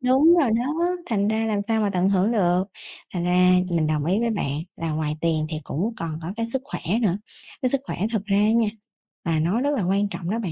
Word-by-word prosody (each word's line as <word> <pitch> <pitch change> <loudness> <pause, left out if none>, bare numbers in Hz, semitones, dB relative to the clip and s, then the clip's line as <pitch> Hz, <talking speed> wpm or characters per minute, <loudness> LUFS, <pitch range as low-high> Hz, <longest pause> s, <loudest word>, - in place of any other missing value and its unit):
Đúng 265 +6 +5
rồi 270 -7 +2
đó, 310 +10 0
thành 205 -2 +1
ra 220 +1 0
làm 210 -2 0
sao 225 -1 +2
mà 205 -2 +1
tận 185 0 +1
hưởng 195 +3 +2
được. 180 -3 +2 0.5
Thành 175 -1 -1
ra 180 +1 +4 0.2
mình 165 -2 +1
đồng 155 -1 0
ý 185 +6 +1
với 235 - +1
bạn 145 -10 -1 0.2
là 165 -1 -3
ngoài 155 -1 -2
tiền 160 -2 +1
thì 155 - -2
cũng 205 +10 -2
còn 160 -2 -4
có 170 +3 -4
cái 230 0 -1
sức 265 -1 -1
khỏe 285 - -5 0.2
nữa, 195 -3 +1 0.4
cái 255 - +2
sức 275 - +1
khỏe - - -5 0.2
thực 210 -3 -1
ra 200 -2 +1
á 210 +1 +4
nha, 230 -1 +3 0.6
là 165 -2 +1
nó 180 +10 +1
rất 285 - +1
là 210 - 0
quan 200 +3 +1
trọng 175 -3 -5
đó 225 - -1
bạn. 190 -8 -3
200 Hz, 250 wpm, -24 LUFS, 170-230 Hz, 0.6 s, Đúng